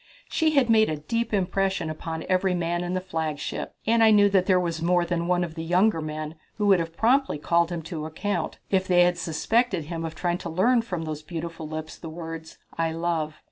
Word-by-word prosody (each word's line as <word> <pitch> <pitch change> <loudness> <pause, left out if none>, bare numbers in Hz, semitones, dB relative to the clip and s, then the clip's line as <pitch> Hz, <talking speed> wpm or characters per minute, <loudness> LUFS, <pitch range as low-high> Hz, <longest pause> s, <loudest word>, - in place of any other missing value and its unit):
She 315 -1 +2
had 270 -4 +4
made 220 -1 +4
a 155 - -2
deep 230 +10 -2
impression 190 -3 0
upon 160 +1 -5
every 185 0 +2
man 175 0 -1
in 175 +1 -2
the - - +1
flagship, 160 -5 -4
and 230 +1 +4
I 220 - +7
knew 205 -1 +6
that 190 -2 +3
there 185 -1 +5
was 170 -2 -2
more 175 +1 +2
than 170 -1 -1
one 180 0 +2
of 165 -2 -5
the 160 0 -5
younger 180 +2 +2
men 155 0 -5 0.2
who 210 - -1
would 195 -3 +5
have 165 0 -4
promptly 260 - +3
called 170 +3 +1
him 170 -2 -4
to 155 -2 -5
account 175 +1 -3
if 190 -1 +2
they 175 -1 +5
had 175 0 +2
suspected 190 +4 +1
him 165 +1 -5
of 165 0 -5
trying 175 0 -1
to 170 - -5
learn 230 +9 +3
from 180 -7 -4
those 155 -1 -5
beautiful 165 0 -6
lips 155 0 -6
the 165 - -7
words, 165 0 -8 0.2
"I 165 -1 0
love." 165 -2 -2
175 Hz, 220 wpm, -25 LUFS, 160-195 Hz, 0.2 s, I